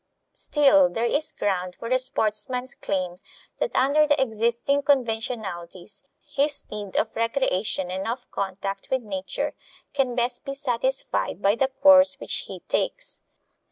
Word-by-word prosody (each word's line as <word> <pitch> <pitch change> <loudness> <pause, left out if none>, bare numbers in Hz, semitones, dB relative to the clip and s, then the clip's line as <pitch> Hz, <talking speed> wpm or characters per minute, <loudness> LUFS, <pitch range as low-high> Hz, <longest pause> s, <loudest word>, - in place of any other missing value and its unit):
Still, 290 -2 +4
there 230 -1 -1
is 290 +6 +1
ground 185 -3 -2
for 230 - -7
the 255 +2 +2
sportsman's 250 +1 -1
claim 180 -2 -3 0.4
that - - -1
under 290 +3 +4
the 290 -1 +3
existing 235 +3 +1
conventionalities 220 -8 -2 0.2
his 285 +1 +1
need 205 -2 -6
of 220 - 0
recreation 220 -6 0
and 190 +2 -3
of 240 +2 -3
contact 195 0 -4
with 260 -2 0
nature 195 -3 -3 0.4
can 265 -3 0
best 245 0 0
be 275 - -5
satisfied 260 - -1
by 200 0 +3
the 265 +4 +2
course 280 +1 +5
which - - -2
he - - -8
takes. - - -2
235 Hz, 140 wpm, -25 LUFS, 200-275 Hz, 0.4 s, course